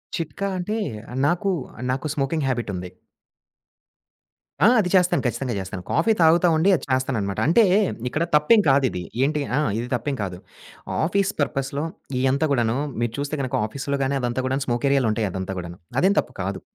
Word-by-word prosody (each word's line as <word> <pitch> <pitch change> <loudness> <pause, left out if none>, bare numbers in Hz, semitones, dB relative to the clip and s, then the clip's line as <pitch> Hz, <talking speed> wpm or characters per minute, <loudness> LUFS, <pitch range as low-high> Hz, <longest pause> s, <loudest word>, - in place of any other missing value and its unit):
చిట్కా 170 +4 -3
అంటే 210 +5 -2 0.5
నాకు 180 +5 +1 0.4
నాకు 135 +4 -2
స్మోకింగ్ 145 +1 -1
హ్యాబిటుంది. 100 -8 -3 1.7
ఆ! - - +7
అది 185 -4 +1
చేస్తాను. 180 -4 +3
ఖచ్చితంగా 125 +1 -2
చేస్తాను. 95 -1 -6
కాఫీ 165 +8 +3
తాగుతా 165 +2 +5
ఉండి, 170 +5 +3
అది 145 - -4
చేస్తాననమాట. 125 -7 0
అంటే 200 +9 +5 0.5
ఇక్కడ 155 +6 -1
తప్పేం 180 +9 +5
కాదిది. 130 -10 +2 0.2
ఏంటి 150 +2 +1 0.2
ఆ! - - +3 0.2
ఇది 120 - -4
తప్పేం 140 +3 -2
కాదు. 90 -3 -5 0.7
ఆఫీస్ 195 +3 +1
పర్పస్‌లో 140 +1 -1 0.3
ఇయంతా 135 +4 +2
కూడను, 120 -3 +1 0.2
మీరు 120 -1 -1
చూస్తే 145 +1 -3
గనక 130 -2 -2
ఆఫీస్‌లో 140 +4 -3
గాని, 135 +1 0
అదంతా 120 +1 -1
గూడాను 135 +1 -1
స్మోకేరియాాలుంటాయి. 120 -3 +1
అదంతా 95 +1 -4
కూడాను. 85 0 -8 0.2
అదేం 195 +3 +3
తప్పు - - -4
కాదు. - - -4
135 Hz, 150 wpm, -23 LUFS, 120-160 Hz, 1.7 s, ఆ